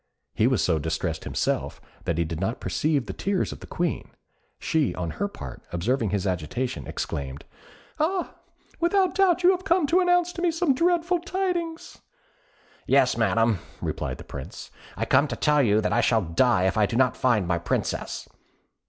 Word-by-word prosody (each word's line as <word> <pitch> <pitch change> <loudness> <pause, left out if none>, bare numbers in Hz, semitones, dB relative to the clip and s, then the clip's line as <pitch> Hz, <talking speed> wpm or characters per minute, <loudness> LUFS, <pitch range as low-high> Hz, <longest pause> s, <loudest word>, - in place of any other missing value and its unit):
He 110 - +3
was 130 -4 +2
so 80 -3 +2
distressed 80 +1 -3
himself - - -1 0.3
that 85 - -1
he 85 - +2
did 80 0 -5
not 110 +7 -2
perceive 135 - 0
the - - -5
tears 195 -1 -1
of - - -8
the - - -11
Queen. 175 -2 -2 0.5
She, 155 -5 0
on 85 -3 -3
her 205 - -2
part, 65 - -9
observing 110 +6 0
his 100 -1 -1
agitation, 95 +8 -2
exclaimed, 70 -1 -5 0.5
"Ah! 350 +4 0 0.5
without 360 +1 +2
doubt, 365 -2 +3
you 360 - +7
have 370 -1 -2
come 345 -2 +3
to 335 +6 +3
announce 355 -1 +3
to 345 - -6
me 355 - +3
some 330 -3 +2
dreadful 345 +4 +2
tidings!" 350 -2 -3 0.9
"Yes, 135 -2 +4
Madam," 115 -2 +2 0.2
replied - - -3
the - - -10
Prince; - - -9 0.3
"I - - -1
come 145 - +4
to - - -4
tell 150 -1 +3
you 110 -4 +3
that 105 - 0
I - - +3
shall 115 -3 +2
die 90 +5 +2
if 95 +1 +1
I 105 - +4
do 115 - -4
not 125 0 +3
find 110 -8 +2
my 85 -1 +1
Princess." 85 - -2
130 Hz, 180 wpm, -25 LUFS, -, 0.9 s, you